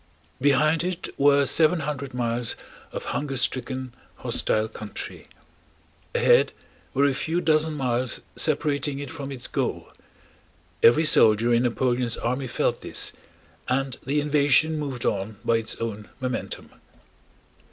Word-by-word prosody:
Behind 150 +4 +3
it 180 -1 -3
were 140 0 +4
seven 165 +3 +3
hundred 140 -3 -4
miles 120 -1 -1 0.4
of - - -5
hunger 140 -2 -2
stricken, 130 0 -2 0.2
hostile 110 0 0
country; 105 -1 -7 0.9
ahead - - +4 0.4
were 140 +2 +4
a 140 - +3
few 160 +5 -1
dozen 155 -2 +2
miles 125 -2 0 0.2
separating 145 -2 +1
it 140 0 -6
from 140 -4 -6
its 130 -3 -5
goal. - - -2 0.9
Every 150 +8 +6
soldier 115 -4 +5
in 120 - +4
Napoleon's 120 -1 0
army 125 +3 -2
felt - - -1
this - - +1 0.6
and 135 0 -1
the 140 +3 0
invasion 150 +1 +3
moved 135 -5 -4
on 100 +2 -1
by 115 - +3
its 115 -1 -2
own 110 -2 -5
momentum. 130 -2 -4
135 Hz, 130 wpm, -25 LUFS, 120-150 Hz, 0.9 s, Every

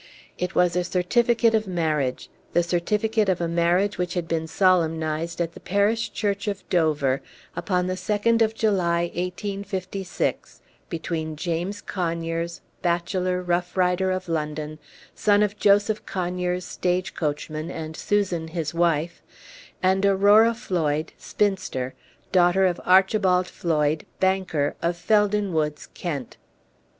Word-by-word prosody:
It 180 +1 -2
was 180 -1 +3
a 180 - +2
certificate 230 +6 +2
of 215 -2 +1
marriage 155 -7 -1 0.3
the 175 - +3
certificate 210 +5 +1
of 185 - +1
a 170 - 0
marriage 175 +4 +1
which 180 0 -2
had 175 -2 -2
been 160 -1 -1
solemnized 165 -2 +1
at 170 -1 -1
the - - -11
parish 205 +4 +1
church 205 -1 -2
of 200 -2 -4
Dover 150 -6 +2 0.3
upon 180 -3 0
the 185 - -1
2d 210 +5 +1
of 220 0 +2
July, 175 -6 +1
1856, 190 0 -3 0.3
between 160 -2 -3
James 175 +5 -3
Conyers, 170 -1 -3 0.2
bachelor, 180 +1 0
rough 180 +1 -1
rider, 180 +1 +2
of 185 0 -2
London, 155 -1 -3 0.3
son 205 0 +3
of 210 0 -2
Joseph 205 +1 +3
Conyers, 180 0 -2
stage 180 +1 -1
coachman, 155 +1 -3
and 160 -2 -6
Susan, 185 -5 0
his 160 -1 -3
wife, 170 -1 0 0.6
and 190 +1 +3
Aurora 205 +4 +5
Floyd, 160 -9 -1
spinster, 185 -11 -1 0.4
daughter 180 +1 +4
of 180 -2 0
Archibald 185 0 +4
Floyd, 155 -2 0
banker, 190 -6 +1
of 170 +1 0
Felden 205 +1 +2
Woods, 150 -1 -1
Kent. 145 -9 -5
180 Hz, 130 wpm, -24 LUFS, 165-195 Hz, 0.6 s, Aurora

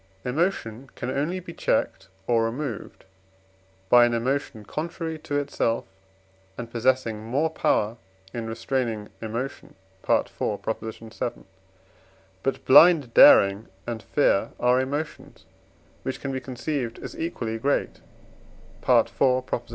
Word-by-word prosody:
Emotion 130 - -1
can 125 - -4
only 150 +7 -1
be 170 -2 -10
checked - - -1 0.2
or 115 0 +2
removed 120 -1 -5 0.8
by 120 +4 +7
an 120 0 +2
emotion 120 -2 -2
contrary 165 - -4
to 145 -1 -3
itself, 135 -5 -1 0.7
and 120 -1 -7
possessing 120 -2 +1
more 140 +8 0
power 110 -7 +1 0.4
in 115 -2 -4
restraining 115 -2 -2
emotion 115 +3 -5 0.3
(IV. - - +3
vii.). 110 +1 -3 1.1
But 135 - -2
blind 150 -4 +7
daring 100 +2 +7 0.2
and 115 -2 -4
fear 125 -8 +1
are 125 +1 +3
emotions, 145 +4 -5 0.6
which 130 - -4
can 135 - -4
be 130 - -2
conceived 125 -2 -4
as - - -8
equally 115 -9 -3
great 140 +5 -1 0.9
(IV. - - +5
125 Hz, 110 wpm, -25 LUFS, 115-145 Hz, 1.1 s, by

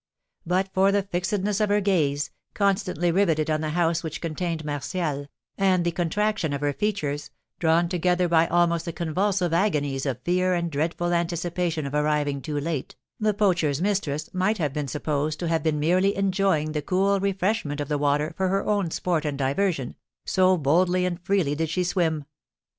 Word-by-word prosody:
But 185 +2 +1
for 195 +1 +4
the 200 0 +2
fixedness 195 +2 -1
of 210 - +2
her 205 0 +3
gaze, 145 -8 +1 0.2
constantly 190 -4 +1
riveted 165 -4 +2
on 155 0 0
the 155 - -2
house 165 -1 +2
which 160 -2 -5
contained 165 -1 -3
Martial, 145 0 -3 0.3
and 185 -3 +3
the 170 - +1
contraction 175 0 0
of 140 - -3
her 145 -1 0
features, 150 -7 -2 0.3
drawn 165 +1 +3
together 180 0 +1
by 165 -1 +4
almost 170 -1 +2
the 170 - -4
convulsive 180 +2 0
agonies 145 -7 0
of 130 -3 -2
fear 185 +1 +2
and 170 -1 -2
dreadful 165 +4 -1
anticipation 170 -1 -1
of 140 - -5
arriving 150 -1 0
too 150 +1 -3
late, 150 -2 -3 0.2
the 215 -2 +1
poacher's 175 -9 +2
mistress 170 -6 -1
might 190 +4 +1
have 150 -6 -1
been 150 -1 -2
supposed 150 +1 -2
to 175 - -2
have 165 -1 +1
been 155 -1 0
merely 185 +6 +2
enjoying 190 -5 +1
the 150 -1 -2
cool 195 +5 +1
refreshment 190 -5 -1
of 145 - -2
the 150 0 -1
water 145 +2 +1
for 190 - 0
her 195 +1 0
own 205 -4 +1
sport 165 -1 -1
and 145 -3 -2
diversion, 140 0 0 0.3
so 185 0 +3
boldly 175 +5 +2
and 180 -1 -3
freely 180 -6 +1
did 160 +1 -1
she 180 +3 0
swim. 165 -4 0
170 Hz, 180 wpm, -25 LUFS, 150-185 Hz, 0.3 s, for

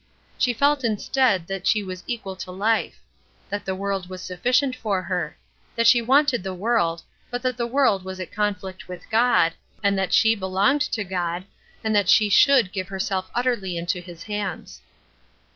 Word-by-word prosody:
She 250 - +3
felt 280 +3 +2
instead 225 -3 +1
that 195 +1 -4
she 210 -2 +3
was 185 -2 -7
equal 210 -5 -4
to 185 - -7
life; 215 +5 0 0.5
that 205 0 -3
the 190 - -2
world 195 -1 -3
was 185 -1 -8
sufficient 250 +9 +1
for 205 -6 -2
her; 180 -1 -3 0.4
that 230 -1 +1
she 235 +1 +6
wanted 265 0 +3
the 190 0 -5
world; 180 -5 0 0.3
but 245 +1 -4
that 255 -1 0
the 235 0 -2
world 235 -7 +2
was 190 0 -7
at 185 - -6
conflict 195 -3 -3
with 180 -1 -9
God, 220 -8 +4 0.3
and 200 0 +3
that 190 - -1
she 220 0 +5
belonged 200 +7 +1
to 215 - 0
God, 180 -1 -3 0.4
and 220 -1 0
that 200 -3 +2
she 210 -1 +5
should 255 -3 +5
give 185 -2 -3
herself 190 0 -3
utterly 235 -8 -1
into 175 +2 -2
his 175 -2 -11
hands. 205 -4 -5
200 Hz, 175 wpm, -23 LUFS, 185-235 Hz, 0.5 s, she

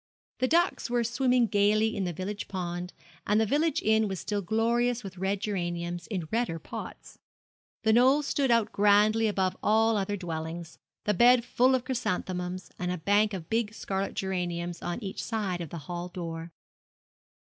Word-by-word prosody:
The 255 - +2
ducks 340 -2 +2
were 240 0 +1
swimming 245 +1 +2
gaily 215 +1 +2
in 195 - -1
the 175 - -1
village 195 +5 -5
pond, 180 -1 -4 0.4
and 210 +1 +3
the 220 - +3
village 295 +6 +1
inn 220 0 +3
was 190 -3 -4
still 205 -1 -2
glorious 235 +4 +1
with 190 -2 -8
red 195 +1 0
geraniums, 175 -3 -3
in 185 -7 -3
redder 230 -7 0
pots. - - -9 0.6
The 220 -1 +4
Knoll 260 +5 +5
stood 275 -1 0
out 230 -2 +3
grandly 210 +2 +4
above 190 -3 0
all 220 +1 +3
other 205 +1 -1
dwellings 165 -1 -6 0.2
the 210 - +1
beds 240 +4 +5
full 255 +1 +3
of 255 -1 -2
chrysanthemums, 185 -7 -3
and 180 -1 -1
a 180 - -2
bank 205 +5 +2
of 165 -4 -7
big 220 0 -1
scarlet 195 -2 -3
geraniums 175 -2 -3
on 175 +7 -4
each 195 - -4
side 200 -6 -2
of 165 - -5
the 170 - -6
hall 175 +1 -4
door. 165 -2 -6
205 Hz, 170 wpm, -28 LUFS, 180-230 Hz, 0.6 s, Knoll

